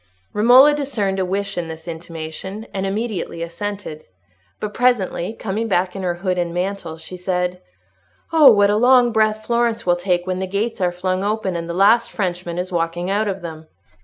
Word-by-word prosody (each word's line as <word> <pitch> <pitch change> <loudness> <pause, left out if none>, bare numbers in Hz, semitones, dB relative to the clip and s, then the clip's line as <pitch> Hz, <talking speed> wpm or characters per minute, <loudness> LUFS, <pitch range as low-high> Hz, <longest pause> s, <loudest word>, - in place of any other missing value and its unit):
Romola 250 +7 +7
discerned 225 -10 -1
a 185 - +1
wish 195 0 -2
in 170 - -4
this 160 +1 -9
intimation, 170 +5 -7
and 195 0 -2
immediately 200 -5 -3
assented. 170 -2 -6 0.6
But 210 -1 -4
presently, 225 -6 +1
coming 220 +1 -3
back 185 -2 0
in 195 - -4
her 180 -2 -1
hood 180 0 -1
and 175 -1 -1
mantle, 180 -3 -3
she 160 +3 -10
said, 180 0 -2 0.7
"Oh, 300 -5 +8
what 205 -1 +4
a 210 - +2
long 245 +1 +5
breath 215 -1 +1
Florence 235 -1 0
will 175 -1 +3
take 175 0 0
when 185 0 -2
the 190 - -2
gates 200 +3 -2
are 180 -1 +2
flung 185 +1 -2
open, 205 -3 -1
and 170 0 -4
the 170 - -3
last 205 +5 +4
Frenchman 175 -3 -3
is 180 +1 -3
walking 175 +1 -1
out 210 +2 +1
of 195 -2 -4
them! 160 -1 -8
190 Hz, 190 wpm, -20 LUFS, 175-215 Hz, 0.7 s, Oh